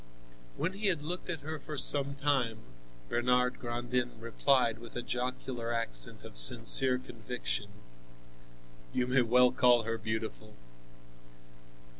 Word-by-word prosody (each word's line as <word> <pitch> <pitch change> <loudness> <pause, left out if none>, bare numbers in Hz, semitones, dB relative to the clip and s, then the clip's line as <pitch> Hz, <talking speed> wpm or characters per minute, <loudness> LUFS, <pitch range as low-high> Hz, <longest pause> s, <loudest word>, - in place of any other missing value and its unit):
When 185 - -2
he 205 +1 -2
had 165 -6 0
looked 180 +5 -5
at 165 -4 -4
her 155 +1 -6
for 150 +1 -7
some 140 0 +2
time, 135 -6 0 0.5
Bernard 125 - +1
Grandin 120 0 -3
replied 115 0 +1
with 120 0 -12
a 120 - -3
jocular 125 -1 -4
accent 115 - -1
of - - -11
sincere 125 - +5
conviction: - - -5 1.2
"You 125 - +1
may 130 +1 +2
well 125 +1 +4
call 125 -2 +4
her 115 0 -3
beautiful!" 110 0 -5
125 Hz, 125 wpm, -31 LUFS, 115-135 Hz, 1.2 s, sincere